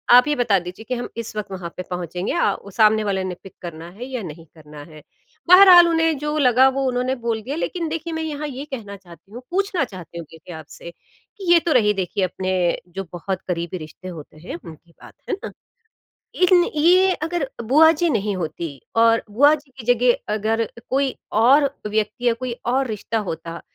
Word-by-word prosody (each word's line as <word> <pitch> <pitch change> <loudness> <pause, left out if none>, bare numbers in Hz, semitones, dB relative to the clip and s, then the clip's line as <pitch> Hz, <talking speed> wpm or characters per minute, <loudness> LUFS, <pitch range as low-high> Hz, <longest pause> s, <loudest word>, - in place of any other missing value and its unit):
आप 250 +3 +7
ये 295 - +1
बता 235 -5 +2
दीजिए 180 +5 -9
कि 255 - 0
हम 240 - -4
इस 230 -2 -6
वक़्त 210 -2 -5
वहाँ 180 -3 -6
पे 185 - -4
पहुँचेंगे, 180 +1 -4
या - - +2
अ, 200 - -8
सामने 215 +1 +3
वाले 195 -2 -1
ने 185 -1 -4
पिक 195 - -12
करना 170 -1 -8
है 220 +7 -8
या 255 -3 -5
नहीं 165 0 -9
करना 150 -2 -12
है? 155 -1 -13 0.5
बहरहाल, 365 -2 +9
उन्हें 325 -2 +1
जो 300 +2 -3
लगा 255 -2 +5
वो 275 0 0
उन्होंने 250 +1 -1
बोल 225 -1 -1
दिया। 265 +6 -5
लेकिन 335 0 -3
देखिए, 330 +1 -4
मैं 320 0 -3
यहाँ 300 -1 -4
ये 270 0 -6
कहना 225 -8 -7
चाहती 175 0 -18
हूँ 240 +3 -9
पूछना 385 -3 0
चाहती 180 -7 -9
हूँ 170 - -6
क्योंकि 160 +2 -13
आपसे 160 +2 -10
कि 380 - -7
ये 340 - +7
तो 335 - +1
रही 210 -3 +4
देखिए 190 0 -2
अपने 185 +1 -2 0.4
जो 195 - -3
बहुत 185 +1 -4
करीबी 175 0 -3
रिश्ते 155 +3 -11
होते 155 -3 -10
हैं 165 - -8
उनकी 165 +1 -13
बात, - - -16 0.2
है 400 - 0
ना। - - -5 0.9
इन 360 -1 +6
ये 365 +5 +5
अगर 330 -4 -2 0.2
बुआ 310 +7 +6
जी 345 -1 +2
नहीं 210 -5 -1
होतीं 160 -3 -5 0.2
और 230 0 +4
बुआ 285 +8 +5
जी 290 -2 -16
की 230 - -9
जगह 240 -3 +1
अगर 220 +2 0 0.2
कोई 270 0 +1 0.3
और 275 +4 +5 0.2
व्यक्ति 215 +3 -1
या 235 - +4
कोई 255 -1 -3 0.2
और 260 +2 +1
रिश्ता 220 +1 -3
होता, 165 +1 -6
225 Hz, 205 wpm, -21 LUFS, 180-285 Hz, 0.9 s, बहरहाल